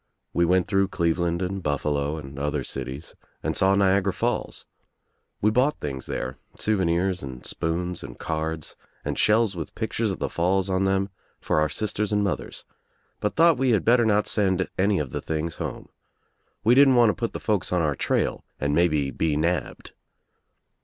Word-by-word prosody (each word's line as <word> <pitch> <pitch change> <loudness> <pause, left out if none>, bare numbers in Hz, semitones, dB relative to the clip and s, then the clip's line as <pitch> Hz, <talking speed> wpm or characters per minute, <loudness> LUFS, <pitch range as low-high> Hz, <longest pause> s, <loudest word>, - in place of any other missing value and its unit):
We 85 - +3
went 90 +1 +3
through 100 -1 +2
Cleveland 85 0 0
and 95 +1 -3
BufFalo 75 0 -1
and 70 -1 -9
other 75 -1 -1
cities 70 +6 -6 0.3
and - - -1
saw 95 +1 +3
Niagara 100 0 +3
Falls. 120 +6 -2 0.8
We 105 - +4
bought 130 +6 +2
things 65 -3 -5
there, 65 +3 -4 0.2
souvenirs 95 -3 0
and 65 -2 -8
spoons 90 +2 -2
and - - -9
cards 80 -1 -4 0.3
and - - -1
shells 110 -2 +3
with 80 -3 -6
pictures 110 -1 -1
of 95 - -4
the - - -2
falls 95 +3 0
on 95 +1 +1
them 95 0 +1 0.3
for 75 - +1
our 75 - +2
sisters 105 0 -2
and 105 0 +2
mothers, 95 -4 -3 0.5
but 105 - -1
thought 165 -4 +5
we 130 -2 +3
had 105 - +1
better 120 +1 +5
not 105 -1 +3
send 95 -3 +1
any 100 +1 +2
of 75 -6 -2
the - - -3
things 80 +1 -3
home. - - -5 0.7
We 115 - +5
didn't 135 0 +6
want 120 -3 +6
to - - -5
put 115 - -3
the - - -4
folks 105 -4 -1
on 90 -2 +2
our 75 -2 +1
trail - - 0 0.2
and 70 +1 0
maybe 75 -4 +2
be 75 -1 0
nabbed. 85 +4 -2
90 Hz, 180 wpm, -25 LUFS, 80-105 Hz, 0.8 s, didn't